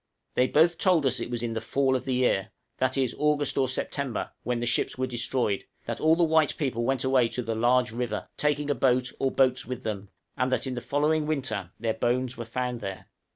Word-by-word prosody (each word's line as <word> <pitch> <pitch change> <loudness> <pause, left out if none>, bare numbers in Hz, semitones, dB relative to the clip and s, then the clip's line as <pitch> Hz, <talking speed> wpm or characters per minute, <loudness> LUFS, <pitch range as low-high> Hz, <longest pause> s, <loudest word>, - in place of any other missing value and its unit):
They 125 - +3
both 165 +4 +3
told 180 -6 +3
us 130 -1 +2
it - - -4
was 120 -1 -3
in 115 -1 -2
the 110 - -3
fall 135 +3 +1
of 130 - -2
the 130 -1 0
year 110 -5 +1 0.3
that 130 +1 +1
is, 130 -3 +1
August 150 -1 +2
or 135 -1 +2
September 130 0 -2
when 125 -1 -1
the 120 - -2
ships 120 - 0
were 130 - 0
destroyed; 120 -4 -1 0.2
that - - -4
all 160 +1 +5
the 175 - +2
white 160 -2 +3
people 130 -6 -1
went 130 +1 0
away 130 -2 +3
to 125 - -3
the 115 - -2
"large 120 +2 +2
river," 115 -2 -3
taking 150 -1 0
a - - +4
boat 130 0 +2
or 135 - +2
boats 130 -1 +2
with 125 0 -5
them, 100 -3 -4 0.3
and 130 0 0
that 130 - +1
in 130 - -3
the 120 - -4
following 150 +5 +1
winter 135 - -2
their 115 0 0
bones 125 +3 0
were 120 - -6
found 125 +1 -3
there. 95 -2 -6
130 Hz, 230 wpm, -27 LUFS, 120-140 Hz, 0.3 s, all